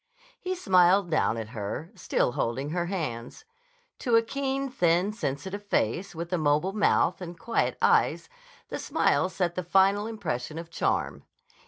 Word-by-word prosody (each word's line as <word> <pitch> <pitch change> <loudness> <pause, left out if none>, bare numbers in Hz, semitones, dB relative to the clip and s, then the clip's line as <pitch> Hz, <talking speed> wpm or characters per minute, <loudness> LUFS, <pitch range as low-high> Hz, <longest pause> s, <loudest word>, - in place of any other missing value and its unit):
He 370 0 -3
smiled 185 - +4
down 135 -7 +2
at 110 -1 -5
her, 110 - -5
still - - 0
holding 130 +5 -2
her 175 0 -1
hands. 150 -11 -5 0.5
To 240 -3 +1
a 230 - +5
keen, 275 +2 -2
thin, 185 -5 +1
sensitive 190 - -4
face, 175 - 0
with 170 +2 -5
a 180 - +1
mobile 150 +5 +1
mouth 205 -2 +2
and 175 -1 -7
quiet 230 +5 -1
eyes, - - +3 0.4
the - - -4
smile 185 - +1
set 180 -2 -1
the 180 - -2
final 195 +4 +3
impression 155 - -4
of 165 0 -7
charm. - - -1
180 Hz, 155 wpm, -27 LUFS, 155-205 Hz, 0.5 s, a